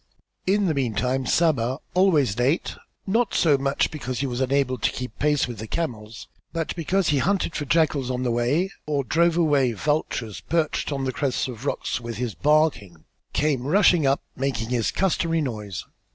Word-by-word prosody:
In 200 +1 +3
the 165 - +1
meantime 130 0 -1
Saba, 135 -7 +2 0.2
always 155 - +3
late 135 +7 +1 0.3
not 225 +3 +1
so 155 -4 +4
much 140 0 0
because 130 -5 -4
he 140 - 0
was 125 -1 -3
unable 130 -1 +1
to - - +2
keep 125 -2 -7
pace 150 -2 +2
with 120 -4 -7
the 110 - -6
camels, 115 -8 -4 0.2
but 165 -1 -3
because 180 +2 0
he 145 -1 +2
hunted 190 +2 0
for 145 - -2
jackals 150 -3 +1
on 125 0 -2
the 125 - 0
way, 135 +11 +1 0.2
or 145 -2 0
drove 170 +6 +2
away 145 -7 +3
vultures 125 -4 -2
perched 160 -2 -1
on 135 -1 -2
the 130 -1 -1
crests 135 -1 -1
of 120 -4 -7
rocks - - -2
with 115 -2 -6
his 120 -3 -2
barking 145 - +1 0.3
came 140 -3 0
rushing 175 -3 +4
up, 135 +1 +1
making 130 -4 -2
his 120 -3 +1
customary 170 -3 0
noise. 105 - -4
140 Hz, 180 wpm, -24 LUFS, 125-160 Hz, 0.3 s, so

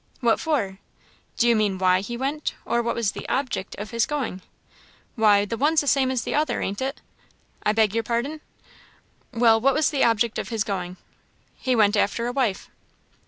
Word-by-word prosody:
"What 235 -2 +2
for?" 225 -12 -1 0.6
"Do 240 - +3
you 235 - +5
mean 210 -3 +1
why 185 0 +3
he 235 +4 -5
went, 280 +4 -2
or 235 - +1
what 235 0 -2
was 230 -4 0
the - - -8
object 260 -8 -2
of 210 +1 -7
his 230 -1 +1
going?" 260 -11 -3 0.7
"Why, 210 -3 +4
the 230 +2 -4
one's 300 +5 +3
the - - -6
same 265 -2 +3
as 255 -3 -1
the - - -3
other, 305 +1 0
ain't 200 +4 -3
it?" 270 +2 -3 0.6
"I 210 - +2
beg 215 -2 +2
your 230 - +1
pardon." 245 +7 -3 0.9
"Well, 230 -2 +4
what 275 +2 +3
was 305 -1 +2
the 280 - +1
object 230 -1 +2
of - - -5
his 225 -3 -1
going?" 185 -3 -4 0.6
"He 255 -1 -1
went 210 -2 +4
after 210 +3 0
a 240 - -1
wife." 245 -8 -1
230 Hz, 195 wpm, -24 LUFS, 205-265 Hz, 0.9 s, you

